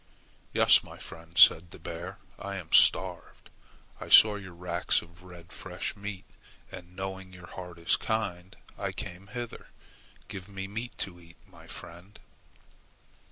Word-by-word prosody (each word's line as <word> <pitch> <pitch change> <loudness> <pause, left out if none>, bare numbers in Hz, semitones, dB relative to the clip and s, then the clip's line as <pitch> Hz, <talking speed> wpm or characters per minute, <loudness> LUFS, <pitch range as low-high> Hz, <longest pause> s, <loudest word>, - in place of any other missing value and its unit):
"Yes, - - +6
my - - -12
friend," 85 +1 -11
said 85 +2 +8
the - - -11
bear. 90 +3 -7 0.2
"I 100 0 -5
am 90 -4 -7
starved. - - +3 0.5
I - - -7
saw 110 -1 +9
your 95 -4 -8
racks 85 0 0
of 85 +1 -18
red 90 -2 -13
fresh 90 0 -4
meat, 100 -2 -6 0.5
and 90 +1 -10
knowing 95 0 -6
your 90 -1 -11
heart 90 -1 -9
is 85 - +2
kind, 95 -5 -3 0.2
I - - -2
came 90 +3 -7
hither. 120 +2 -6 0.6
Give 95 0 -8
me 95 -1 -5
meat 115 +5 -6
to 90 -2 -13
eat, 85 0 -17
my - - -16
friend." 90 +5 -11
90 Hz, 150 wpm, -29 LUFS, 85-100 Hz, 0.6 s, saw